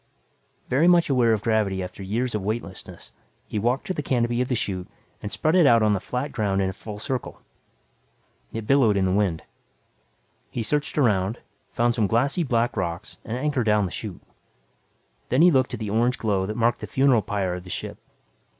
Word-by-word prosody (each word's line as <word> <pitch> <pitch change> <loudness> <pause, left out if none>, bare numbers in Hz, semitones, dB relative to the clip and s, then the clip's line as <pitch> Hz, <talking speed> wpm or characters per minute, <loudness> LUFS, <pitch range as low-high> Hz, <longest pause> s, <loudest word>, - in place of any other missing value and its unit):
Very 145 +7 +3
much 175 -4 +4
aware 120 -3 +4
of 110 -2 0
gravity 105 -4 +1
after 90 - -8
years 115 +6 -2
of 105 - -1
weightlessness, 100 -2 -5 0.3
he 105 - -3
walked 120 +5 0
to 185 - -2
the 150 - -3
canopy 120 -3 0
of 125 - 0
the 125 - 0
chute 95 -5 -3 0.3
and 105 - -5
spread 155 - 0
it 180 -5 +6
out 115 -4 +5
on 105 -1 +3
the 100 - 0
flat 125 +8 -4
ground 100 -3 0
in 95 - +1
a - - -5
full 105 +2 -8
circle. 125 +3 -4 1.1
It 115 -1 -5
billowed 115 -5 +4
in 95 - +2
the 95 - +1
wind. 95 -5 0 1.1
He 115 - -3
searched 150 +8 -1
around, 110 -5 +2 0.3
found 120 0 +1
some 110 -3 +1
glassy 135 - +1
black 120 -5 0
rocks 85 +4 -4
and 115 +1 -4
anchored 135 -4 -1
down 105 -1 +3
the 90 - -5
chute. 100 -5 -7 1.1
Then 130 +6 +4
he 180 - +7
looked 130 -3 +2
at - - -9
the 105 -3 -4
orange 120 +3 +2
glow 100 -4 0
that 105 - -4
marked 120 +1 +2
the - - -6
funeral 130 -4 +3
pyre 95 -2 -2
of 90 0 -6
the 90 - -12
ship. - - -5
115 Hz, 200 wpm, -24 LUFS, 100-125 Hz, 1.1 s, he